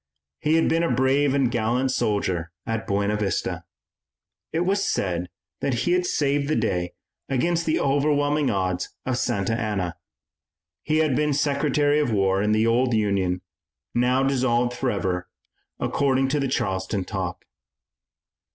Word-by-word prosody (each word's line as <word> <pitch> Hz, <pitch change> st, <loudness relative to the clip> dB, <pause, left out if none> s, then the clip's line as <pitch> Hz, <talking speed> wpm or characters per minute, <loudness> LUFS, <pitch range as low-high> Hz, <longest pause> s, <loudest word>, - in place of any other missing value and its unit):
He 155 Hz, +1 st, +2 dB
had 165 Hz, -, +3 dB
been 165 Hz, -, +2 dB
a 170 Hz, -, +1 dB
brave 135 Hz, +2 st, +2 dB
and 135 Hz, -4 st, +2 dB
gallant 120 Hz, +3 st, +1 dB
soldier 95 Hz, -8 st, -1 dB
at 115 Hz, 0 st, -3 dB
Buena 100 Hz, 0 st, +1 dB
Vista. 100 Hz, -4 st, -2 dB, 0.9 s
It 165 Hz, -, 0 dB
was 195 Hz, +3 st, +1 dB
said 90 Hz, -, -1 dB, 0.3 s
that 135 Hz, -, 0 dB
he 175 Hz, -, +2 dB
had 180 Hz, 0 st, +2 dB
saved 140 Hz, -2 st, +1 dB
the 155 Hz, -, +1 dB
day 90 Hz, -6 st, -1 dB, 0.4 s
against 165 Hz, +6 st, 0 dB
the 155 Hz, -, +2 dB
overwhelming 145 Hz, +1 st, +2 dB
odds 95 Hz, -2 st, -1 dB, 0.2 s
of 125 Hz, -1 st, -1 dB
Santa 110 Hz, -3 st, 0 dB
Anna. 105 Hz, -6 st, -2 dB, 0.9 s
He 155 Hz, 0 st, 0 dB
had 155 Hz, -4 st, +2 dB
been 150 Hz, +1 st, +1 dB
Secretary 145 Hz, +1 st, +2 dB
of 145 Hz, -5 st, +1 dB
War 95 Hz, -2 st, +2 dB
in 105 Hz, +1 st, +1 dB
the 110 Hz, +1 st, +3 dB
old 120 Hz, +1 st, +2 dB
Union, 95 Hz, -4 st, 0 dB, 0.5 s
now 125 Hz, +2 st, +2 dB
dissolved 125 Hz, -3 st, +1 dB
forever, 100 Hz, -8 st, -1 dB, 0.5 s
according 135 Hz, -1 st, +1 dB
to 145 Hz, +2 st, +1 dB
the 140 Hz, -, 0 dB
Charleston 95 Hz, -5 st, -1 dB
talk. 95 Hz, -3 st, -4 dB
125 Hz, 145 wpm, -24 LUFS, 100-145 Hz, 0.9 s, had